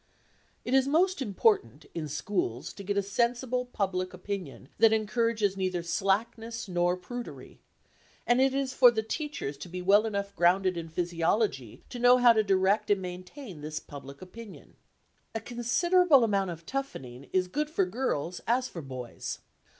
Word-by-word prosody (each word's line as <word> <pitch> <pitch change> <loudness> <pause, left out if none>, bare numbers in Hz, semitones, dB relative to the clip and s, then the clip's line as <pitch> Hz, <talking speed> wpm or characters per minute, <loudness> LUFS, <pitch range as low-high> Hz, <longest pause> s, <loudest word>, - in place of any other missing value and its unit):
It 245 - -2
is 265 0 +4
most 355 +4 +2
important 395 - +1
in 160 -2 -4
schools 150 - -3
to 200 - -9
get 200 +1 -2
a 200 - +2
sensible 240 +4 0
public 185 -5 -2
opinion 180 -8 -6
that 225 0 +6
encourages 220 -2 +1
neither 185 -2 -2
slackness 225 +6 -1
nor 175 0 +1
prudery, 245 +6 -8 0.7
and 240 +2 +3
it 270 0 +4
is 270 -1 -1
for 250 -2 +7
the 220 -2 -1
teachers 220 - -4
to 180 - -9
be 180 +1 -5
well 200 +4 +4
enough 200 -1 -3
grounded 185 +2 +3
in 165 -1 -5
physiology 170 - -1
to 245 - -7
know 245 +1 +6
how 245 -1 +7
to 220 - +3
direct 200 +1 +2
and 205 -1 +3
maintain 185 - -8
this 155 +1 -4
public 140 +1 -11
opinion. 215 +3 -12 0.6
A - - 0
considerable 275 - +3
amount 200 -4 +1
of 165 -1 -8
toughening 140 - -6
is 185 -1 +1
good 295 +10 -2
for 195 -11 +1
girls 180 - -2
as 250 +2 +2
for 170 - -8
boys. 130 -4 -6
200 Hz, 160 wpm, -29 LUFS, 180-240 Hz, 0.7 s, for